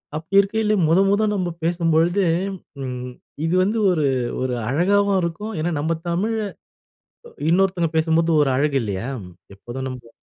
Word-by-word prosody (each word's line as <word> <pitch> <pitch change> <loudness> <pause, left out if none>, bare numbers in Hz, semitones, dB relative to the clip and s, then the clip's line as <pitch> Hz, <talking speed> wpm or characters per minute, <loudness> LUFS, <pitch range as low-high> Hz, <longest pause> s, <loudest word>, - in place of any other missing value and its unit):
அப்படி 160 +5 -1
இருக்கையில, 215 +2 0
மொத 165 +4 +4
மொத 205 +2 +2
நம்ப 185 -3 -1
பேசும்பொழுது, 170 +2 +2 0.6
ம் 125 -1 -5 0.4
இது 165 +2 +1
வந்து 210 +4 0
ஒரு, 155 -4 +1 0.4
ஒரு 130 -1 -1 0.2
அழகாவும் 200 +7 +2
இருக்கும். 170 +6 -4
ஏன்னா 165 +3 -1
நம்ப 160 +3 0 0.2
தமிழ்ல, 215 +6 0 1.1
இன்னொருத்தங்க 180 -1 +2
பேசும்போது, 160 +1 +2
ஒரு 140 - +1
அழகு 140 0 +1
இல்லையா, 105 +2 -3 0.5
எப்போதும் 120 +6 -7
நமக்கு. 125 -2 -8
165 Hz, 135 wpm, -22 LUFS, 145-195 Hz, 1.1 s, மொத